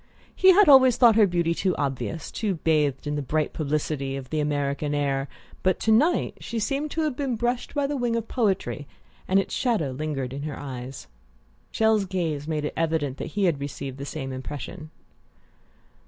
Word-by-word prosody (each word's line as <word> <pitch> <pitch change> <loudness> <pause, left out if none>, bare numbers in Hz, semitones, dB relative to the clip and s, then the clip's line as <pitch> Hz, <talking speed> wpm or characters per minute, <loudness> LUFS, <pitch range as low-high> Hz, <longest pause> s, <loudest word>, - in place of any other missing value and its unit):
He 375 - +7
had 410 +2 +6
always 260 -3 +7
thought 235 -3 +6
her 215 -2 +6
beauty 170 -2 +1
too 185 +1 0
obvious, 140 +3 -3
too 205 -4 -1
bathed 150 -4 +1
in 145 - -2
the 145 - -1
bright 150 +3 -1
publicity 145 -2 -2
of 130 -2 -8
the 155 - 0
American 145 0 -1
air; 140 -1 0 0.3
but 185 -1 +1
to 220 - +2
night 295 +11 +3
she 235 - -5
seemed 275 +8 -1
to 320 - -2
have 305 -4 0
been 265 -3 -1
brushed 240 +4 -2
by 285 -1 +1
the 290 +1 -2
wing 240 -3 0
of 230 -1 -2
poetry, 195 - -1 0.4
and 190 +1 +4
its 195 - -3
shadow 220 - 0
lingered 135 -2 -3
in 140 - -5
her 145 -1 -5
eyes. 130 - -7 0.7
Chelles' 220 -2 +2
gaze 165 -6 -2
made 155 -2 -1
it - - -3
evident 155 -5 -1
that - - -6
he 205 - +2
had 170 -6 +2
received 140 -1 -6
the 140 - -5
same 135 -3 -5
impression. 145 +5 -7
160 Hz, 190 wpm, -25 LUFS, 140-225 Hz, 0.7 s, He